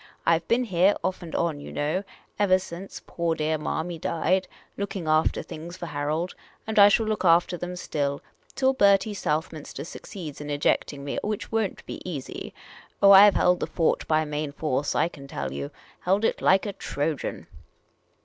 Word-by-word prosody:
I 165 -1 +4
've - - -27
been 240 +2 +2
here, 190 -2 +3
off 185 0 -2
and 170 -2 -7
on, 165 -4 0
you 145 - -9
know, 155 +7 -1 0.4
ever 190 -2 +5
since 185 +1 -8
poor 170 -1 -1
dear 155 0 -1
Marmy 165 +2 -3
died, 185 +4 0 0.3
looking 200 -4 -4
after 155 0 +2
things 170 +3 -8
for 175 - -6
Harold; 155 +3 -2 0.3
and 220 -1 +1
I 200 0 +9
.shall 220 +2 +3
look 215 -2 -1
after 175 0 +4
them 175 +1 -5
.still, 140 -5 -2 0.4
till 265 0 +3
Bertie 200 -3 +4
Southminster 155 -5 -3
succeeds 160 -2 -8
in 150 - -6
ejecting 145 -1 0
me, 140 - -3
which 210 -1 -4
won't 225 -4 -1
be - - -7
easy. 155 -8 -6 0.5
Oh, 200 0 +7
I 200 +1 +10
've - - -3
held 180 0 +3
the - - -2
fort 165 - 0
by 155 0 +2
main 150 -1 -3
force, 145 -2 -1
I - - +3
can 140 -5 -11
tell 70 - -4
you; 70 +1 -4 0.3
held 195 +4 +1
it - - 0
like 190 +2 +4
a 205 - -3
Trojan. 150 -3 -3
170 Hz, 185 wpm, -26 LUFS, 150-195 Hz, 0.5 s, I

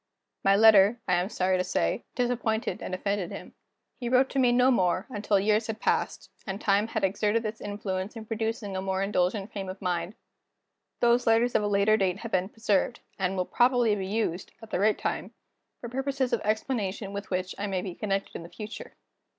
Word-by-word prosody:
My 195 0 +5
letter, 215 +1 +6
I 180 - +2
am 180 +2 +1
sorry 185 -3 +1
to - - +2
say, 180 - -1
disappointed 235 -5 -1
and 185 - -3
offended 200 -1 -2
him. - - -9 0.5
He 240 -2 -3
wrote 255 +1 +4
to 275 - 0
me 250 -2 +4
no 250 +2 +4
more, 185 -4 +1
until 205 -2 +1
years 215 +2 +2
had 220 -1 -4
passed, - - -1 0.2
and 195 0 -3
time 205 0 +2
had 220 -2 -3
exerted 210 +4 +1
its 215 +1 -4
influence 205 0 -4
in 225 -1 -7
producing 225 -2 -3
a 190 - -2
more 190 0 -1
indulgent 195 +1 0
frame 195 -2 -5
of 190 +1 -7
mind. 180 +1 -2 0.9
These 240 0 +3
letters 230 +2 +4
of - - +3
a 205 - 0
later 205 +1 +3
date 190 -3 +1
have 230 - -6
been 185 -1 +1
preserved, 220 +1 0 0.2
and 190 0 0
will 180 - 0
probably 245 -1 +3
be 195 -2 -2
used, 195 -4 -2
at 225 -1 -13
the - - 0
right 210 +2 +3
time, - - -3 0.4
for 240 - -6
purposes 265 +1 -2
of 235 - +1
explanation 210 -2 -2
with 200 0 -6
which 185 0 -2
I 205 - -2
may 190 -2 -2
be 185 - -5
connected 195 +1 -3
in - - -5
the 165 - -10
future. 215 +2 -8
205 Hz, 205 wpm, -28 LUFS, 190-225 Hz, 0.9 s, letter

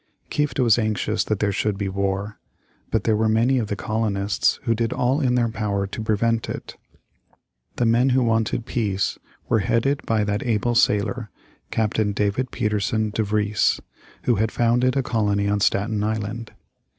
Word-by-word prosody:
Kieft 150 -1 -1
was 120 -3 +4
anxious 110 0 0
that 105 - 0
there 100 +1 0
should 100 +1 -1
be 100 -1 -2
war. 100 +2 -2 0.5
But 110 -2 0
there 110 - +2
were 110 +1 +1
many 120 +4 +3
of 110 - -2
the 105 - -2
colonists 105 -1 0
who 115 -3 +2
did 115 0 -1
all 130 +5 +1
in 125 -3 +2
their 120 -1 +2
power 105 -3 -2
to 105 +4 -6
prevent 110 +1 0
it. - - -6 1.0
The 120 - +1
men 120 +3 +3
who 130 0 +3
wanted 115 0 0
peace 100 -5 -1 0.3
were 110 - +2
headed 115 +8 +1
by 110 -2 +2
that 105 +1 -1
able 120 0 0
sailor, 110 0 +1 0.4
Captain 110 -1 0
David 105 +5 0
Pietersen 105 0 -1
De 110 - -1
Vries, 105 0 +1 0.4
who 120 - +2
had 110 +2 +1
founded 125 +3 +2
a 135 - +2
colony 105 -4 0
on 100 0 +1
Staten 105 +1 +1
Island. 110 +1 -3
110 Hz, 170 wpm, -23 LUFS, 105-115 Hz, 1.0 s, was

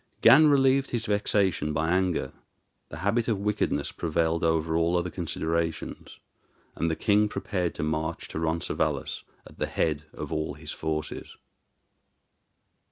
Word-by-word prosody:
Gan 155 0 +8
relieved 135 -1 +4
his 115 -2 -2
vexation 100 -6 +1
by 80 +2 0
anger; 90 -7 0 0.6
the 75 - -8
habit 115 +3 +2
of 110 -4 +1
wickedness 105 +1 -1
prevailed 85 0 0
over 80 0 +1
all 85 +2 +2
other 90 0 -2
considerations; 80 -1 -3 0.6
and 85 - 0
the 80 - 0
king 105 +3 +3
prepared 90 -5 -2
to - - -3
march 80 +1 -2
to - - -4
Roncesvalles 80 +1 -1 0.2
at - - -15
the - - 0
head 75 -1 -1
of - - -5
all 75 0 -2
his - - -8
forces. 80 -1 -4
85 Hz, 140 wpm, -27 LUFS, 80-105 Hz, 0.6 s, Gan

